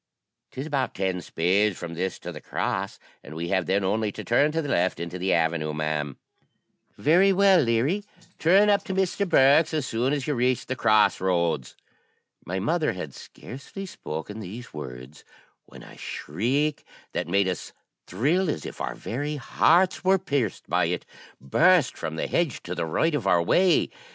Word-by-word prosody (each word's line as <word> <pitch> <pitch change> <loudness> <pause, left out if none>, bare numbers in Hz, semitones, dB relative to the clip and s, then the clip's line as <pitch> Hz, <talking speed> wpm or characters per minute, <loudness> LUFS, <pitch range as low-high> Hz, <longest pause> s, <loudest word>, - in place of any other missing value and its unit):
''Tis 135 - -5
about 140 -4 -2
ten 95 -2 -1
spades 95 +5 +1
from 85 -1 -6
this 90 +2 -3
to - - -7
the - - -9
cross, - - -3 0.3
and 80 - -10
we 85 +1 -4
have 95 -4 0
then 95 +2 +1
only 105 +2 0
to - - -7
turn 145 +6 +3
to 165 - -1
the 155 - -2
left 90 -7 +1
into 85 +2 -5
the 95 +2 0
avenue, 80 -2 +1
ma'am.' 75 -2 -2 0.8
'Very 180 +7 +4
well, 195 -1 +5
Leary; 135 - +1 0.4
turn 195 +6 +5
up 200 -1 +2
to 190 - -3
Mr. 190 +1 0
Bourke's 155 +1 +5
as 150 -4 -1
soon 120 +3 0
as 145 -2 -1
you 150 - 0
reach 125 -1 +1
the 130 - -3
cross 110 -5 +3
roads.' 85 -8 0 0.7
My 90 +2 -4
mother 155 - 0
had 80 -7 -7
scarcely 140 +10 -9
spoken 105 - -7
these 110 +4 -9
words, 65 -1 -9 0.4
when - - -13
a - - -14
shriek, 135 - -2 0.3
that - - -2
made 100 +2 +2
us 90 -2 -4 0.4
thrill 155 - +1
as 80 - -3
if - - -8
our - - -3
very 145 +5 -4
hearts 175 +7 +2
were 190 +1 +4
pierced 140 - -2
by - - +2
it, - - -2 0.3
burst 160 - +3
from 80 - -5
the 80 - -2
hedge 170 -7 -1
to 90 - -5
the 85 -2 -3
right 160 - +1
of 130 -9 -1
our 85 -3 +4
way. 180 - +3
115 Hz, 180 wpm, -25 LUFS, -, 0.8 s, well